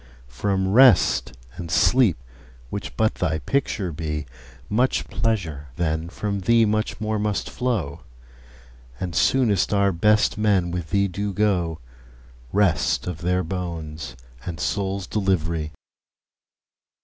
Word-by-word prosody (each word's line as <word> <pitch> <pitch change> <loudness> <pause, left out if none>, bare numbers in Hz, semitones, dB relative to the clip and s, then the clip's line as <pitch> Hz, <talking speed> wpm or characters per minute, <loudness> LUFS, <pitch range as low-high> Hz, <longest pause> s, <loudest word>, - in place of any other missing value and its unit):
From 95 +6 0
Rest 125 - +5 0.2
and 85 -1 -6
Sleep, 120 +2 +4 0.5
which 100 - -6
but 110 0 +2
thy 80 -3 +1
picture 105 - -1
be, 75 -1 -3 0.4
5 - - -23
Much 125 +5 +1
pleasure, 85 -11 -2
then 80 -1 -1
from 100 +2 -3
thee 115 +4 +4
much 110 0 -1
more 110 0 -1
must 105 -1 -1
flow; 110 - -2 1.0
And 90 -2 -4
soonest 105 -6 +2
our 100 0 +3
best 105 +5 +2
men 100 -5 +2
with 85 -2 -4
thee 100 +1 +2
do 100 +2 -3
go— 90 -6 +1 0.7
Rest 95 -7 +2
of 90 -3 -5
their 90 +1 +1
bones 80 -6 -5 0.3
and 85 -4 -6
souls' 95 +4 -2
delivery! 85 -6 -1
95 Hz, 125 wpm, -23 LUFS, 85-105 Hz, 1.0 s, Rest